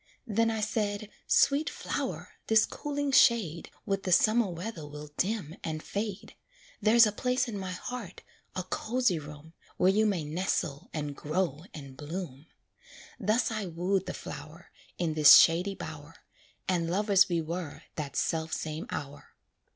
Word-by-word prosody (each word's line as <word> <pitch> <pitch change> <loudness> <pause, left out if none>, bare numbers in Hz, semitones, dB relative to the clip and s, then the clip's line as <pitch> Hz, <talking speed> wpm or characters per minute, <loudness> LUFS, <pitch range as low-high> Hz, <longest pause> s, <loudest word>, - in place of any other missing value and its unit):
Then 230 0 +1
I 220 -1 -2
said, 210 -1 -2 0.2
"Sweet 285 +2 +3
flower, - - -4 0.2
this 220 -1 +5
cooling 285 -1 -3
shade 220 - +4 0.2
With 195 -2 -1
the 185 - -3
summer 215 +4 +4
weather 175 0 -6
will 150 0 -9
dim 185 -6 -2
and 155 -1 -4
fade, 205 -1 -4 0.5
There's 225 +2 +7
a 210 - +1
place 250 +5 0
in 230 - -5
my 190 -2 -4
heart 205 0 -7 0.3
a 185 - -2
cozy 220 0 0
room 150 +2 -11 0.2
Where 185 +1 +4
you 215 +2 +3
may 190 -6 0
nestle 150 -2 -2
and 145 -2 -4
grow 155 0 -2
and 140 -3 -10
bloom." 150 -1 -7 0.7
Thus 220 +4 +1
I 215 -3 -3
wooed 180 +3 -1
the - - -4
flower, - - -9 0.3
In 170 -3 -1
this 155 -2 +9
shady 180 +4 +4
bower, - - -9 0.5
And 170 -3 0
lovers 195 +1 +4
we 170 -1 +1
were 165 -1 -5
that 145 -3 -5
self 160 -1 -1
same 155 0 -4
hour. 140 0 -7
185 Hz, 150 wpm, -29 LUFS, 160-215 Hz, 0.7 s, this